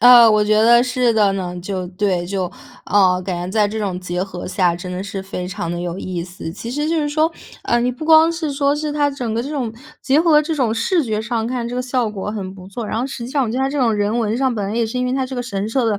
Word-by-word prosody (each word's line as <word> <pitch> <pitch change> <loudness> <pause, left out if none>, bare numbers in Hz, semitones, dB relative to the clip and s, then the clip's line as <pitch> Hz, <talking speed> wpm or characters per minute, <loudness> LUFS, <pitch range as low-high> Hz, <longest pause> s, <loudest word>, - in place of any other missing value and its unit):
呃， 240 -1 +9
我 210 -1 +3
觉 215 - +1
得 235 +2 +6
是 250 -1 +1
的 210 -3 +3
呢。 180 -2 -4
就， 185 -1 -3
对， 180 -2 -1
就， 190 0 -2 0.4
呃， 185 -3 +3
感 185 -2 -2
觉 175 +1 -4
在 210 +1 +3
这 215 +2 -4
种 195 -4 -2
结 180 0 -3
合 185 -2 -6
下 180 -2 +1
真 180 +1 -7
的 180 - -3
是 195 -1 -5
非 180 -2 -5
常 170 -2 -4
地 175 - -3
有 175 +1 -4
意 180 -3 -4
思。 180 -2 -7
其 230 +6 -7
实 295 +3 -1
就 330 +1 0
是 295 - -1
说， 310 +2 +1 0.3
呃， 240 0 +1
你 245 - +1
不 255 +5 -7
光 320 +1 +6
是 325 -3 -3
说 280 +1 +1
是 300 0 -2
它 290 -1 +2
整 245 -5 -4
个 230 +1 -1
这 275 - -5
种 260 -7 -3 0.3
结 280 +3 +3
合 310 -3 +5
这 320 +1 -2
种 240 -6 +1
视 330 +10 +1
觉 220 -4 -1
上 230 -1 -2
看 245 -1 -2
这 240 - -5
个 250 - -1
效 250 -3 -1
果 205 0 -4
很 195 -3 -5
不 185 0 -12
错， 220 +2 -5
然 220 - -2
后 255 - -1
实 255 -3 -6
际 250 - -7
上 280 -2 +1
我 - - -3
觉 230 - -4
得 - - 0
它 270 0 +1
这 290 - -2
种 240 -4 +3
人 210 +3 0
文 220 0 0
上 260 -2 +1
本 205 -2 -2
来 215 - -3
也 235 - +2
是 250 +3 -4
因 250 - 0
为 250 - 0
它 265 -1 0
这 260 0 -6
个 245 - -2
神 200 -4 -3
社 235 +2 0
的 210 -2 +1
225 Hz, 325 characters per minute, -19 LUFS, 195-260 Hz, 0.4 s, 呃